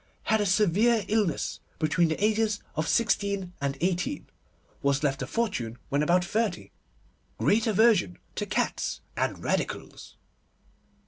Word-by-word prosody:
Had 220 -1 +2
a 205 - +1
severe 210 +3 +3
illness 205 -8 0 0.2
between 160 +2 +2
the 160 - 0
ages 215 -1 +1 0.2
sixteen 200 -2 0
and 140 -1 -1
eighteen. 185 +10 -1 0.6
Was 140 -1 +1
left 135 -2 0
a - - -3
fortune 195 - -2
when 140 +1 +1
about 175 +4 +3
thirty. 215 -1 -1 0.7
Great 220 +2 +2
aversion 215 - +3 0.2
to - - -3
cats - - -1
and - - -2
Radicals. - - -3
190 Hz, 125 wpm, -27 LUFS, 155-220 Hz, 0.7 s, severe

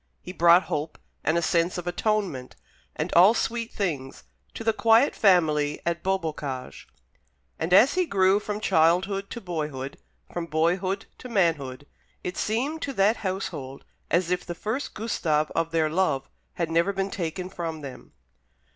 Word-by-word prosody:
He 180 - -9
brought 170 +1 +6
hope, 150 +1 -4 0.3
and 160 - +2
a 170 - 0
sense 170 +2 +1
of 175 - -5
atonement, 180 - -1 0.4
and - - -3
all 190 +7 +7
sweet 230 0 -2
things, 145 -10 -3 0.3
to - - -5
the 225 0 +2
quiet 230 +5 +4
family 155 -7 +3
at 170 -1 -1
Beaubocage; 155 -9 -3 0.7
and 160 - -2
as 215 +9 +7
he 365 -1 +1
grew 190 -2 +3
from 210 0 -4
childhood 190 +2 +2
to - - -6
boyhood, 150 - -5 0.3
from 170 -1 -3
boyhood 180 +5 0
to 250 - -9
manhood, 150 - 0 0.4
it 180 - -4
seemed 270 +9 -1
to 275 - -3
that 210 +1 +3
household 185 -9 -5 0.2
as 175 +1 +1
if 180 0 0
the 175 - -6
first 220 +10 -4
Gustave 155 -9 0
of 165 - 0
their 165 -1 +1
love 155 -5 0 0.3
had 170 -2 -2
never 170 +4 +2
been 195 0 -2
taken 180 0 -3
from 165 -4 -5
them. 135 -3 -10
175 Hz, 155 wpm, -26 LUFS, 160-200 Hz, 0.7 s, all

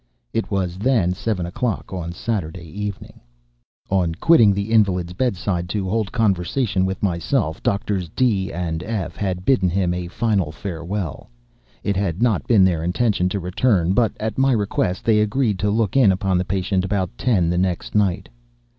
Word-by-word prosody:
It 115 - -1
was 95 -3 -2
then 110 -6 +2
seven 95 -2 -2
o'clock 100 +4 -3
on 85 -2 -4
Saturday 90 -4 -4
evening. 100 +3 -6 0.7
On 90 -4 +1
quitting 115 - +5
the 100 +2 -2
invalid's 90 -6 +2
bed 125 +3 0
side 90 -1 -2
to 100 -1 -2
hold 105 0 -1
conversation 100 -1 +1
with 95 +2 -4
myself, 85 - 0
Doctors 100 -3 -1
D—— 100 -3 +1
and 85 -2 -3
F—— 105 -1 -4
had 95 -2 -3
bidden 110 -9 +3
him 90 0 0
a 90 0 -4
final 100 -4 0
farewell. 85 0 -5 0.5
It 100 - 0
had 95 -3 -1
not 115 -5 +1
been 110 -5 +5
their 85 -4 +1
intention 90 +1 +1
to 100 - -2
return; 90 0 +1
but, 115 +1 +2
at 110 +2 -3
my 135 0 +4
request, 100 -4 -1
they 110 -2 +4
agreed 105 -1 +1
to 105 - +1
look 110 +1 0
in 125 -8 +6
upon 95 -1 0
the 90 - -1
patient 95 0 0
about 95 -2 -2
ten 95 -9 +1
the 90 - 0
next 90 -2 -1
night. 100 -4 +1
95 Hz, 170 wpm, -21 LUFS, 90-110 Hz, 0.7 s, in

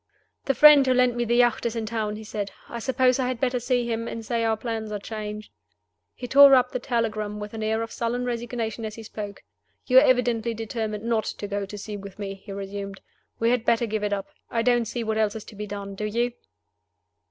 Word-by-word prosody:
"The 270 - +1
friend 295 -1 +8
who 255 - +4
lent 250 -1 +3
me 240 0 0
the 235 +1 +1
yacht 240 -1 +3
is 235 -1 -1
in 225 -1 -2
town," 215 -1 -2
he 220 - -8
said. 210 -1 -4 0.2
"I 235 - -6
suppose 255 +1 +2
I 255 - +1
had 255 -2 -2
better 250 -1 +1
see 245 0 0
him, 230 0 -2
and 225 -1 -6
say 230 +1 0
our 225 -1 +1
plans 220 -2 -4
are 210 - -2
changed." 210 0 -6 0.6
He 245 - -6
tore 275 +2 +8
up 255 - +3
the 250 - -2
telegram 215 -4 -2
with 210 +1 -7
an 220 - -5
air 220 +1 0
of 225 - -7
sullen 240 +1 -2
resignation 235 -2 -3
as 215 -1 -5
he 225 - -9
spoke. 205 -2 -7 0.4
"You 255 +1 +7
are - - +5
evidently 240 -4 +2
determined 220 -1 -4
not 225 -2 0
to 205 - -5
go 200 0 -3
to 210 - -8
sea 205 +1 -6
with 200 -1 -10
me," 200 -1 -4
he 195 +1 -12
resumed. 195 0 -6 0.4
"We 230 +1 +2
had 245 -2 +1
better 235 0 +2
give 215 -1 -2
it 205 - 0
up. 200 -1 -2 0.2
I 230 -1 0
don't 240 -1 +3
see 235 +2 -3
what 220 0 -1
else 215 -1 +1
is 220 - -6
to - - -12
be 210 +1 -5
done. 200 0 -6
Do 210 +2 -4
you?" 235 +3 0
225 Hz, 240 wpm, -25 LUFS, 210-240 Hz, 0.6 s, friend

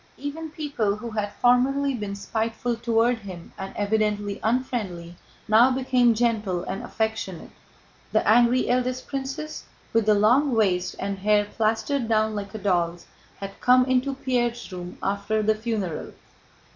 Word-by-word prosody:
Even 310 +3 -5
people 280 -10 -1
who 230 +2 -7
had 210 -1 -2
formerly 265 +4 +3
been 205 -4 -4
spiteful 225 +4 -2
toward 230 +1 +1
him 185 -5 -10
and 190 0 -6
evidently 205 -1 0
unfriendly 215 -8 -2 0.3
now 220 +4 +6
became 255 -2 +3
gentle 215 -6 0
and 195 - -4
affectionate. 220 -6 -3 0.6
The - - +1
angry 240 +3 +4
eldest 255 +1 0
princess, 275 +3 -5 0.3
with 225 -2 +2
the 215 - +6
long 245 +6 +3
waist 185 -5 +1
and 195 0 -3
hair 205 +1 +3
plastered 225 +4 -1
down 215 -1 +2
like 200 -1 -5
a - - -2
doll's, 175 -4 0 0.3
had 195 0 -8
come 250 0 +5
into 260 +1 +1
Pierre's 240 -4 -1
room 180 -1 -7
after 200 +2 0
the 220 +1 +3
funeral. 215 -7 -3
220 Hz, 145 wpm, -25 LUFS, 200-250 Hz, 0.6 s, now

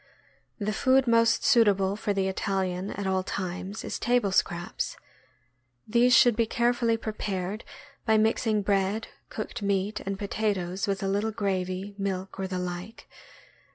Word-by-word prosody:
The 210 -1 -2
food 260 +3 +3
most 230 -1 +3
suitable 200 -4 +4
for 210 0 -2
the 195 -1 0
Italian, 190 -1 -1
.at 200 - -4
all 190 0 +1
times, 185 +2 -4
is - - -4
table 240 -4 +2
scraps. 175 -2 -1 0.9
These 240 +2 +5
should 240 -1 +6
be 230 0 +1
carefully 235 0 +1
prepared 210 -2 -4 0.4
by 220 -1 +3
mix 220 +2 +2
ing 215 -2 +2
bread, 200 +2 0 0.2
cooked 215 - -5
meat, 200 +1 0
and 195 0 -4
potatoes 200 -3 -2
with 195 0 -1
a - - 0
little 205 +3 0
gravy, 195 -2 -2
milk, 190 -1 -3
or 190 - -1
the 185 -1 -3
like. 180 +4 -6
200 Hz, 150 wpm, -27 LUFS, 190-220 Hz, 0.9 s, should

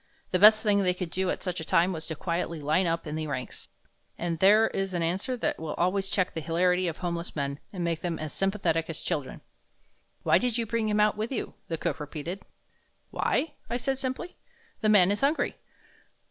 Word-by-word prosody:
The 185 - +2
best 215 +2 +8
thing 205 -2 +3
they 180 -2 +2
could 180 -3 -5
do 190 0 0
at - - -2
such 180 -2 -2
a - - -4
time 175 +3 +3
was 160 -2 -5
to 160 - -3
quietly 170 0 -2
line 155 +5 +2
up 165 0 -1
in 150 - -5
the 155 0 -3
ranks. 130 -3 -6 0.5
And 170 -1 -2
there 210 +4 +6
is 195 -1 -2
an 170 - 0
answer 195 +10 -1
that - - -1
will 160 -1 -4
always 190 +2 +1
check 185 -2 +1
the 160 - -3
hilarity 180 +3 +2
of 165 - -3
homeless 170 -1 -4
men 140 -1 -2
and 180 -3 -4
make 165 -1 -1
them 170 -2 -2
as 155 -2 -5
sympathetic 180 -5 0
as 165 - -3
children. 145 -7 -3 0.8
"Why - - +5
did 245 -2 0
you 230 - 0
bring 225 0 -1
him 210 0 +1
out 210 0 +3
with 220 +3 -2
you?" 255 - -3
the 165 - -2
cook - - -2
repeated. 155 +5 -5 0.7
"Why?" 320 - 0 0.2
I 240 - 0
said, 265 +2 -1
simply, 265 +7 -4 0.4
"the 215 - +1
man 200 -3 +6
is 205 - -1
hungry." 285 +4 +1
180 Hz, 215 wpm, -28 LUFS, 165-210 Hz, 0.8 s, best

